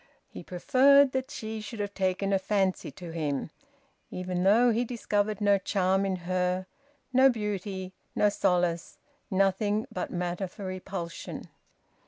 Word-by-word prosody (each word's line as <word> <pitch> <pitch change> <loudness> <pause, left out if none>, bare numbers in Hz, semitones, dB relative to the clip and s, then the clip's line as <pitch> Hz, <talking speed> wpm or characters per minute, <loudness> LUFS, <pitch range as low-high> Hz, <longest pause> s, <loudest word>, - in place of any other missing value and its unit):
He - - -9
preferred 270 +9 +4
that 260 0 -2
she 220 0 -5
should 215 +1 -8
have 205 -1 -3
taken 195 +1 0
a 195 - +3
fancy 190 -1 0
to 175 -3 -9
him, 150 -2 -2 0.6
even 180 0 -3
though 225 +6 +5
he 230 +2 +1
discovered 215 -3 -1
no 205 -1 +4
charm 190 0 +1
in 190 - 0
her, 180 0 0 0.5
no 260 +1 +7
beauty, 200 -4 -3 0.2
no 210 - +4
solace, 175 -4 0 0.3
nothing 195 +2 +1
but 180 - -3
matter 180 +1 -2
for 195 +2 -9
repulsion. 185 -2 -6
195 Hz, 140 wpm, -28 LUFS, 180-215 Hz, 0.6 s, no